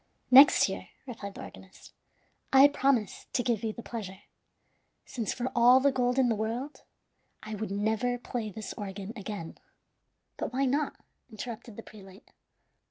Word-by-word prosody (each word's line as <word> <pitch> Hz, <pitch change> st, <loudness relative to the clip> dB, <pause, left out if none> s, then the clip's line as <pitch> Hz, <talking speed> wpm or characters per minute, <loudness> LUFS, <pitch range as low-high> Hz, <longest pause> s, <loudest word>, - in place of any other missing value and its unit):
"Next 270 Hz, +3 st, +8 dB
year," -, -, -6 dB, 0.2 s
replied 210 Hz, -6 st, -8 dB
the -, -, -8 dB
organist, 190 Hz, 0 st, -14 dB, 0.6 s
"I 270 Hz, +1 st, +8 dB
promise 270 Hz, -7 st, 0 dB
to 245 Hz, -, +1 dB
give 235 Hz, -4 st, -1 dB
you 220 Hz, -, -1 dB
the 235 Hz, -, -10 dB
pleasure; 205 Hz, -5 st, -7 dB, 0.8 s
since, 230 Hz, -5 st, -3 dB
for 255 Hz, 0 st, -3 dB
all 245 Hz, +2 st, +7 dB
the 280 Hz, +1 st, +3 dB
gold 250 Hz, -1 st, 0 dB
in 260 Hz, -2 st, +4 dB
the 235 Hz, -, +2 dB
world, 230 Hz, +7 st, -4 dB, 0.6 s
I 215 Hz, -, -7 dB
would 215 Hz, 0 st, -4 dB
never 220 Hz, +5 st, 0 dB
play 235 Hz, -2 st, -5 dB
this 210 Hz, +1 st, -7 dB
organ 200 Hz, +1 st, -7 dB
again." 205 Hz, -6 st, -7 dB, 0.8 s
"But -, -, -4 dB
why 270 Hz, +2 st, +1 dB
not?" 285 Hz, +3 st, 0 dB, 0.3 s
interrupted 225 Hz, 0 st, -8 dB
the 225 Hz, -, -9 dB
prelate. 195 Hz, 0 st, -15 dB
230 Hz, 155 wpm, -29 LUFS, 210-250 Hz, 0.8 s, Next